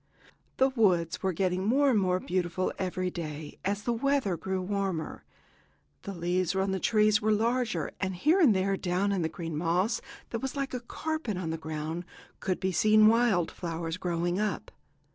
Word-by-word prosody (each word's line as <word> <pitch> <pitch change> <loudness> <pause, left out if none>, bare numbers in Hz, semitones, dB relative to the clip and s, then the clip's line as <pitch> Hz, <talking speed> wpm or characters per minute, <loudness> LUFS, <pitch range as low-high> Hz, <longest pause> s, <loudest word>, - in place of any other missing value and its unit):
The 265 +1 +4
woods 180 -8 +2
were 190 - +1
getting 185 +1 0
more 270 +6 +3
and 220 - +3
more 185 -1 +1
beautiful 185 0 -1
every 185 -1 -1
day 155 -3 -6
as 205 +1 -1
the 240 - 0
weather 260 -5 +1
grew 190 +3 -3
warmer. 190 -3 -3 0.8
The 200 - -6
leaves 180 +1 0
on 190 0 +1
the 190 - -1
trees 215 0 +3
were 215 +1 +2
larger, 225 - 0
and 190 -1 -2
here 310 - +3
and 270 - +6
there, 195 +1 +1
down 190 +2 0
in 195 -2 0
the 160 - 0
green 165 -1 -5
moss, 180 +7 +1 0.3
that 230 - -2
was 265 +1 -3
like 275 -1 -3
a 250 - -1
carpet 280 - -3
on 170 -3 -3
the - - -1
ground, 160 +2 -4 0.4
could 185 - -1
be 190 0 0
seen 215 +3 +6
wild 225 -7 +3
flowers 165 -1 -4
growing 175 0 -1
up. 210 0 -2
190 Hz, 180 wpm, -29 LUFS, 175-215 Hz, 0.8 s, and